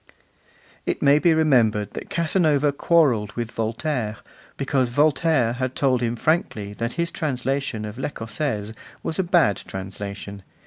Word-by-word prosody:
It - - -1
may 145 +1 +6
be 170 +2 +4
remembered 120 -10 +3
that - - -8
Casanova 155 -4 +2
quarrelled 135 -9 +2
with 120 0 -4
Voltaire, 115 0 -2 0.4
because 135 -2 +1
Voltaire 145 -2 +2
had 130 +1 -3
told 130 -3 +2
him 120 0 0
frankly 110 -8 -1
that 115 +3 -3
his 170 0 -1
translation 135 -5 -2
of 105 +3 -7
L'Ecossaise 115 -4 -3 0.3
was 160 - -3
a - - +3
bad 170 - +3
translation. 100 +1 -7
130 Hz, 135 wpm, -23 LUFS, 110-155 Hz, 0.4 s, may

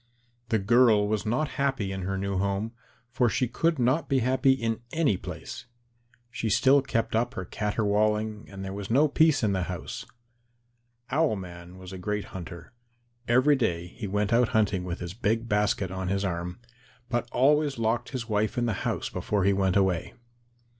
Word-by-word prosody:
The 110 - +3
girl 110 0 +4
was 110 0 -1
not 125 +8 +1
happy 135 -8 0
in 95 0 -4
her 95 +1 -2
new 100 -1 -2
home, 100 +3 -1 0.4
for 125 -1 +2
she 125 - 0
would 165 -1 +3
not 130 +6 +1
be 135 - +3
happy 130 +2 +3
in 115 -4 -2
any 160 -10 +2
place. 120 - -8 0.6
She 115 -1 -2
still 135 +6 +5
kept 115 -5 -1
up 120 +3 0
her 90 - -4
caterwauling 105 +1 0
and 95 -1 -7
there 95 - -5
was 100 0 -6
no 140 +7 +4
peace 155 -2 +3
in 105 - +2
the 95 - 0
house. - - -6 1.0
Owl 155 -5 +2
man 90 -1 -9
was 95 0 -10
a 95 - -7
great 105 +2 -2
hunter. 85 +1 -8 0.5
Every 130 +5 +5
day 90 -10 -1
he 110 +2 -7
went 105 +2 0
out 120 0 +4
hunting 100 -4 +1
with 90 0 -5
his 85 0 -5
big 115 +1 -1
basket 105 -3 +1
on 95 0 -4
his 100 +1 0
arm, 90 +2 -3 0.5
but 120 -1 -1
he 120 - -26
always 145 +1 +3
locked 115 +1 0
his 125 -4 -5
wife 105 0 0
in 120 - +1
the 115 - 0 0.2
house - - -2
before 105 -2 -1
he 100 +1 +4
went 95 -1 +1
away. 95 -3 +1
110 Hz, 185 wpm, -27 LUFS, 95-125 Hz, 1.0 s, still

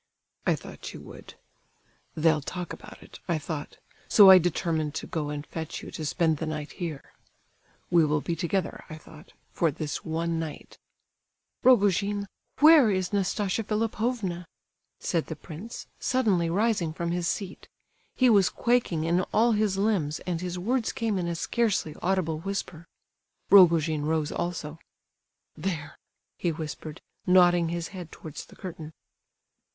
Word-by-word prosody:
"I - - +4
thought - - -9
you - - -9
would. - - -12 0.8
'They'll 155 -1 +3
talk 180 +5 -5
about - - -12
it,' - - -13
I 170 -3 +1
thought; 150 -1 -6 0.3
so 200 -3 +9
I 185 - +10
determined 160 -3 -1
to - - -4
go 150 -3 -3
and 145 0 -5
fetch 160 0 -6
you - - -8
to 160 - -6
spend 160 -1 +1
the 160 - -4
night 150 -1 -4
here—'We 165 +1 -4
will 150 0 +1
be 165 +3 -3
together,' 180 +3 -2
I 155 - -7
thought, 155 0 -15 0.2
'for 165 - +1
this 150 0 -4
one 165 +1 -2
night—'" 160 -2 -7 0.8
"Rogojin, 205 -4 +3 0.4
where 305 -6 +8
is 185 -1 -1
Nastasia 200 +1 0
Philipovna?" 215 -4 -2 0.5
said 165 -3 -1
the 160 - -5
prince, 180 +12 -9
suddenly 205 -10 +1
rising 195 -3 +1
from 170 +1 -3
his 175 -1 -1
seat. 190 -1 -4 0.5
He 255 - +4
was 200 -6 +5
quaking 235 -10 +1
in 170 +2 +2
all 235 +2 +4
his 210 -3 +1
limbs, 195 -8 0
and 175 -2 -3
his 180 0 -4
words 230 +6 0
came 220 -4 -1
in 175 - -2
a 170 - -2
scarcely 205 -5 0
audible 175 -4 0
whisper. 170 -3 -5 0.6
Rogojin 165 -5 +6
rose 155 -1 0
also. 165 -3 -4 0.8
"There," 165 -7 -4 0.4
he 175 - 0
whispered, 155 0 -7 0.3
nodding 175 -2 +5
his 170 0 -3
head 180 -5 -9
towards 155 -3 -9
the - - -16
curtain. 165 -4 -8
175 Hz, 145 wpm, -27 LUFS, 160-200 Hz, 0.8 s, I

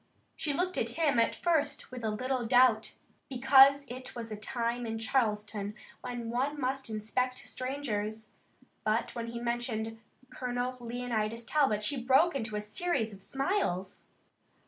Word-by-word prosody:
She 300 - -2
looked 360 +5 0
at - - 0
him 295 -7 +3
at 230 - +3
first 300 -6 0
with 250 -2 -7
a 220 - +1
little 255 +4 -1
doubt, 245 -2 +4 0.3
because 270 +2 +6
it 255 +1 -8
was 230 -2 -6
a - - -2
time 235 +2 -2
in 225 0 -2
Charleston 210 -3 -1 0.3
when 245 -2 -4
one 275 +5 -1
must 265 -1 -1
inspect 235 +4 -1
strangers, 220 -5 -3 0.5
but 230 +2 0
when 235 -1 -4
he 235 0 -5
mentioned 235 -2 -2 0.3
Colonel 250 0 -2
Leonidas 235 -2 -2
Talbot 255 -8 +2
she 270 +3 0
broke 270 +7 +5
into 225 -5 -3
a 210 - -1
series 220 +1 -1
of 195 - -12
smiles. 270 - -1
245 Hz, 145 wpm, -31 LUFS, 220-270 Hz, 0.5 s, because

